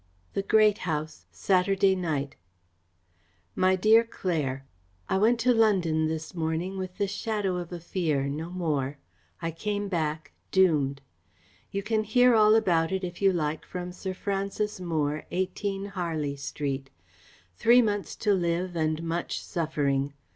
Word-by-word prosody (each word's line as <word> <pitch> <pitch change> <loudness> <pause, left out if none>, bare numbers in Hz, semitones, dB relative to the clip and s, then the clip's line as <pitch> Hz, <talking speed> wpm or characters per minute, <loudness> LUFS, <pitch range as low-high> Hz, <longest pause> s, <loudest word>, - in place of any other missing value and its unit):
The - - 0
Great 215 +1 +4
House, 155 0 -4
Saturday 195 +1 +2
night. 150 -6 -2 1.2
MY 185 0 +3
DEAR 215 +4 +5
CLAIRE, 150 - -3 0.4
I 190 - +1
went 230 +3 +3
to 250 +2 +4
London 180 -9 +3
this 160 0 -4
morning 165 +3 -2
with 185 -1 -6
the 200 - +1
shadow 200 -1 -2
of 175 -1 -6
a 175 - -5
fear 160 -5 -1
no 155 +4 -4
more. 150 -6 -2 0.5
I 165 - -1
come 205 +4 -3
back 155 -3 -2 0.2
doomed. 150 -8 +2 0.7
You 200 0 -3
can 215 +1 0
hear 245 +3 +4
all 215 -1 +6
about 175 -7 +2
it, 190 0 -1
if 175 +1 -6
you 195 -1 +5
like, 155 -3 -2
from 180 -1 -6
Sir 185 +1 -5
Francis 200 +1 -2
Moore, 155 -3 -1
18 195 +2 -2
Harley 165 -7 -3
Street. 140 -1 -4 0.7
Three 240 - +5
months 205 -2 -2
to 205 - +5
live 175 0 -1
and 155 0 0
much 170 +1 -2
suffering! 145 -5 -1
180 Hz, 145 wpm, -27 LUFS, 155-200 Hz, 1.2 s, all